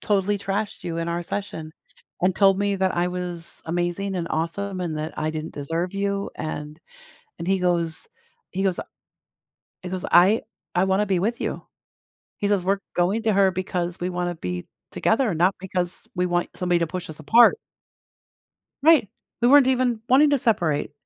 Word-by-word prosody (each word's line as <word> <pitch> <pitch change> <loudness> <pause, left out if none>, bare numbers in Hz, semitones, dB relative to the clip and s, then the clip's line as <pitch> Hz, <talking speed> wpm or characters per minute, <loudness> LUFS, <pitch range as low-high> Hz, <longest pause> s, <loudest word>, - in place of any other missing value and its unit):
totally 205 0 +1
trashed 200 +2 -3
you 170 -1 -3
in 165 0 -2
our 170 +1 -2
session, 170 -4 -5 0.5
and 185 0 +3
told 195 -1 +4
me 200 0 +1
that 190 -1 0
I 175 +1 +2
was 180 -2 -5
amazing, 175 +4 -1
and 170 -2 -2
awesome, 185 +4 -2
and 165 -3 -2
that 155 +1 -4
I 155 - 0
didn't 155 0 -5
deserve 165 +5 -3
you, 200 0 -1
and" 150 0 -6 0.6
And 170 - -5
he 190 0 +2
goes 170 -3 0 0.4
he 190 +1 -2
goes, 190 -3 +1
uh - - -3 1.0
he 180 - -5
goes, 185 0 -4
"I 190 +6 +6 0.3
I 180 - +4
wanna 190 +2 +2
be 190 -2 +1
with 225 +7 -1
you." - - -4 0.7
He 205 - -1
says, 200 -3 +2
"We're 195 +2 +1
going 190 +6 +1
to 220 -1 +2
her 195 -1 +4
because 180 -1 -3
we 180 +1 -2
wanna 175 0 -2
be 90 - -5 0.3
together, 225 -2 +2
not 180 +4 +3
because 180 -1 -3
we 180 -1 +1
want 175 0 0
somebody 180 -1 +1
to 170 - +1
push 180 +2 -5
us 155 - -7
apart." 235 - +6 1.2
Right. 300 -8 +6 0.3
We 240 - +5
weren't 280 0 +7
even 255 -3 +1
wanting 285 +4 +6
to 285 - +3
separate. 175 -13 +1
185 Hz, 180 wpm, -24 LUFS, 170-200 Hz, 1.2 s, weren't